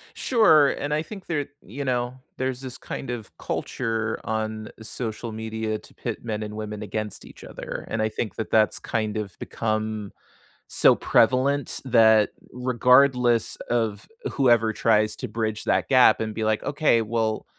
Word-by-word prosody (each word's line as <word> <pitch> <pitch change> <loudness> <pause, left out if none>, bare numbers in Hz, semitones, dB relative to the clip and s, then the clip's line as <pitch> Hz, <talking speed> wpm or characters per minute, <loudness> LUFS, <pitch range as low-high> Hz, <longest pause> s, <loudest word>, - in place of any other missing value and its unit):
Sure, 160 - +5
and 145 +1 -3
I 150 - +1
think 195 +3 -9
there 145 -5 -2 0.2
you 130 +9 -6
know, 125 -1 -1 0.2
there's 130 0 -2
this 130 -2 -7
kind 135 - -7
of 120 -4 -6
culture 110 -1 -2
on 110 -1 -3
social 115 0 -5
media 110 0 -3
to - - -18
pit - - -5
men 110 -2 -3
and 105 0 -6
women 105 -1 -5
against 105 0 -5
each - - -14
other. - - -7
And 115 - -2
I 110 - +1
think 110 -2 -4
that 110 - -5
that's 110 -3 +3
kind 110 -2 -2
of 105 -3 -5
become, 110 -2 -3 0.6
so - - +5
prevalent 140 +2 +2
that, 110 -4 +5 0.2
regardless 125 -1 +3
of 115 -3 -1 0.3
whoever 120 -4 +3
tries 110 -1 +2
to 125 - -6
bridge 110 0 -2
that - - +1
gap 125 -4 +6
and 110 -1 -3
be 110 - -2
like, 110 0 +1
"Okay, 145 -5 +2
well 110 0 -1
115 Hz, 160 wpm, -25 LUFS, 110-125 Hz, 0.6 s, gap